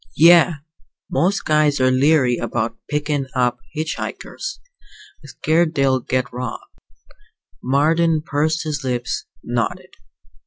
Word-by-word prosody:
"Yeah. 170 +1 +6 0.6
Most 195 +4 +1
guys 150 -2 +2
are 130 0 +3
leery 130 -2 +3
about 115 -1 -2
pickin' 145 -2 -1
up 125 -1 +1
hitch 155 0 -3
hikers. 395 +1 -6 0.6
Scared 160 +3 0
they'll 135 -2 +2
get 125 0 -2
robbed." 125 -1 -5 1.0
Marden 155 +4 +2
pursed 155 +1 0
his 150 -2 -3
lips, 125 -1 -2 0.2
nodded. 120 -3 -3
145 Hz, 110 wpm, -20 LUFS, 125-160 Hz, 1.0 s, Yeah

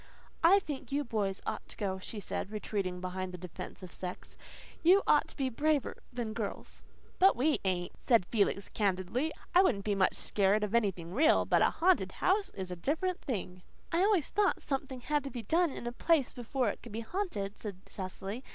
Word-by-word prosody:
"I 355 +4 +8
think 295 -8 -4
you 285 +1 +1
boys 205 -6 -1
ought - - -4
to - - -6
go," 190 -2 -2
she 210 +3 -6
said, 195 - -4
retreating 200 -4 -3
behind 185 0 -3
the 180 - -7
defence 180 +2 -8
of 180 - -8
sex. 180 -1 -7 0.5
"You 370 +4 +6
ought 300 - +4
to - - -12
be 270 - +1
braver 290 +3 +1 0.2
than 235 -3 -3
girls." 215 -2 -5 0.4
"But 385 +1 +6
we 295 +5 +2
ain't," 180 -2 -1
said 230 -7 +4
Felix 200 -1 +1
candidly. 200 - 0 0.2
"I 365 - +8
wouldn't 215 - +2
be 210 - +1
much 195 -1 +2
scared 205 +1 +2
of 210 0 -2
anything 190 -7 0
REAL. 310 +7 +4
But - - +3
a - - +5
haunted 335 - +2
house 390 +1 +1
is 185 -1 -4
a - - -3
different 320 - -1
thing." 185 -7 -4 0.3
"I 335 - +2
always 390 -7 +3
thought 410 -2 +2
something 270 -2 -3
had 295 +3 0
to 275 - -4
be 240 -4 -6
done 335 - +3
in 265 - -7
a 240 - -2
place 300 +2 +2
before 245 0 -1
it - - -5
could 235 - -10
be 225 - -3
haunted," 225 - -3
said 200 -4 -6
Cecily. 195 +4 -5
230 Hz, 200 wpm, -32 LUFS, 195-300 Hz, 0.5 s, I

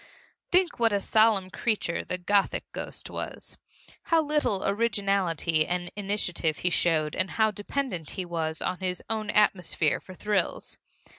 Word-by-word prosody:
Think 360 -4 +2
what 230 -1 +4
a 200 - +2
solemn 215 -3 +3
creature 210 -7 -1
the 180 - -3
Gothic 200 +2 +1
ghost - - -5
was! - - -6 0.5
How 330 -1 +3
little 295 -10 0
originality 195 -7 +1
and 175 0 -2
initiative 195 -6 -1
he 180 - 0
showed 155 -3 +2
and 185 +1 0
how 220 -1 +2
dependent 205 - -3
he 185 - -2
was 160 -2 -3
on 180 - -2
his 180 -2 -3
own 215 -1 -2
atmosphere 180 -7 +2
for 185 - -12
thrills! 205 -2 -1
195 Hz, 145 wpm, -27 LUFS, 175-215 Hz, 0.5 s, what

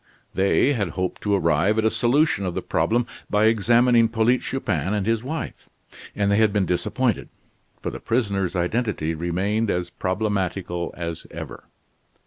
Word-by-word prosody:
They 100 +8 +3
had 100 -8 -1
hoped 95 0 -2
to 105 -1 +1
arrive 90 +4 +2
at 110 - +2
a 110 - +3
solution 125 -3 +2
of 90 - -4
the - - -3
problem 120 +1 +1 0.2
by 105 +1 +3
examining 115 +2 +4
Polyte 115 +2 +2
Chupin 95 - -2
and 100 -2 -1
his 115 0 +1
wife, 155 +6 -6 0.5
and 100 -1 +1
they 100 - +3
had 110 -1 +4
been 100 -2 +1
disappointed; 90 -1 -1 0.5
for - - -2
the - - -7
prisoner's 100 -6 -1
identity 90 -3 -1
remained 95 +7 -1
as 90 -1 -1
problematical 95 -2 -2
as 85 -2 -5
ever. - - -8
105 Hz, 155 wpm, -23 LUFS, 90-115 Hz, 0.5 s, examining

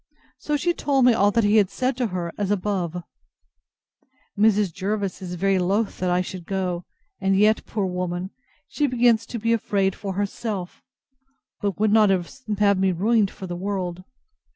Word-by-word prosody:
So 300 0 -1
she 345 +4 +1
told 275 -5 +2
me 250 - +6
all 205 -2 +3
he 220 -1 +3
had 200 -3 +4
said 255 +5 -1
to 250 -2 0
her, 180 -3 -4
as 205 -2 -2
above. 180 -4 -1 1.3
Mrs. 205 -3 +3
Jervis 200 +1 -3
is 180 -1 -5
very 195 +1 +1
loath 195 +4 0
I 180 0 +2
should 180 -1 -7
go; 180 -3 -2 0.3
and 195 0 +2
yet, 215 +2 +3
poor 210 -3 -1
woman! 180 0 -3 0.4
she 295 - 0
begins 235 -3 +3
to 235 - -5
be 230 +1 +1
afraid 200 -4 +1
for 195 -1 -5
herself; 200 -1 -4 0.8
but 200 -1 -2
would 215 -1 +3
not 215 -2 +5
have 200 +1 0
me 190 0 +3
ruined 205 +3 +2
for 190 - -9
the 175 -1 -5
world. 185 -1 -3
200 Hz, 165 wpm, -23 LUFS, 185-220 Hz, 1.3 s, me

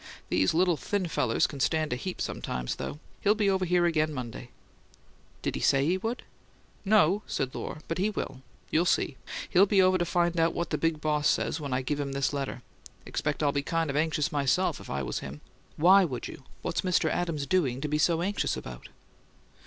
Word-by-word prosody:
"These 95 - +2
little 175 -1 +3
thin 200 +1 -1
fellers 125 -7 +1
can 140 - -5
stand 155 0 +1
a - - 0
heap 180 +9 -5
sometimes, 60 -1 -3
though. - - -5 0.2
He'll 210 +1 +4
be 205 -2 +2
over 190 -1 +1
here 175 0 +3
again 155 -2 +2
Monday." 125 -1 -6 0.9
"Did - - -1
he - - -4
say 135 0 +3
he 180 +4 +1
would?" 225 +5 -3 0.6
"No," 205 -1 +4
said 130 -1 -2
Lohr. 150 - -6
"But 165 - -3
he 200 +3 +2
will. 135 -10 -5 0.3
You'll 165 +3 +3
see. - - +1 0.3
He'll 195 +2 +6
be 200 -1 +3
over 185 0 +5
to - - +2
find 175 0 +1
out 165 0 +2
what 170 - -2
the - - +1
big 165 -2 0
boss 150 -1 +1
says 160 - +1
when 140 -3 -5
I 130 +1 0
give 145 +3 -2
him 140 -1 -3
this 140 +1 0
letter. 135 -3 -4 0.4
Expect - - -2
I'd 145 -1 +2
be 140 - +1
kind 165 0 -1
of - - -5
anxious, 155 0 +1
myself, 140 -4 +1
if - - -12
I 70 0 -2
was - - -3
him." 70 +2 -8 0.4
"Why 190 +5 +7
would 130 -9 -3
you? 135 - -11 0.2
What's - - -1
Mr. 180 -3 +2
Adams 160 -4 -1
doing 140 -8 +1
to 150 - -1
be 150 +1 0
so 165 +2 +2
anxious 200 +2 -1
about?" - - -9
155 Hz, 210 wpm, -28 LUFS, 140-180 Hz, 0.9 s, Why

